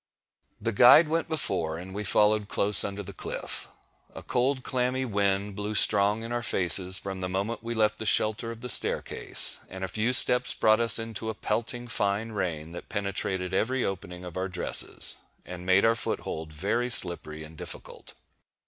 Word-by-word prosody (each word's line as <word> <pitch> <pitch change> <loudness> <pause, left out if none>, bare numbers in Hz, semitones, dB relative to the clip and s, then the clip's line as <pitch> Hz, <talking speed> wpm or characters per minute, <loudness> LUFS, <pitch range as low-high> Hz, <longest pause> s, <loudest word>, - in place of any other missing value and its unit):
The 115 +2 -3
guide 125 +8 +6
went 165 +1 -2
before, 85 - -3
and 95 +2 -10
we 105 +2 -5
followed 105 0 +1
close 105 0 +5
under 100 +1 -6
the - - -11
cliff. - - -5 0.5
A - - -10
cold 130 +1 -2
clammy 130 +1 -2
wind 100 -2 -2
blew 105 +1 -5
strong 105 +1 +2
in 115 - -8
our 120 0 -3
faces 95 -2 +3
from 95 -1 -8
the 90 - -4
moment 100 +5 -4
we 115 +1 -6
left 105 -1 0
the 110 - -5
shelter 110 +2 +2
of 115 0 -10
the 125 - -7
staircase; - - +4
and 95 +1 -9
a - - -3
few 110 +5 -2
steps 125 0 +5
brought 110 0 +2
us 115 -1 +4
into 115 -1 -6
a 110 - -5
pelting, 120 +3 -4
fine 105 0 -3
rain, 85 -6 -5
that 85 - -11
penetrated 95 -2 -3
every 125 +6 -1
opening 90 -2 -7
of 90 0 -10
our 95 +1 -4
dresses, 90 -1 +1 0.3
and 90 0 -10
made 95 +2 +3
our 115 - +3
foothold 80 -8 -6
very 100 +10 -3
slippery 80 -8 +3
and 80 +1 -14
difficult. - - -11
105 Hz, 180 wpm, -25 LUFS, 95-115 Hz, 0.5 s, guide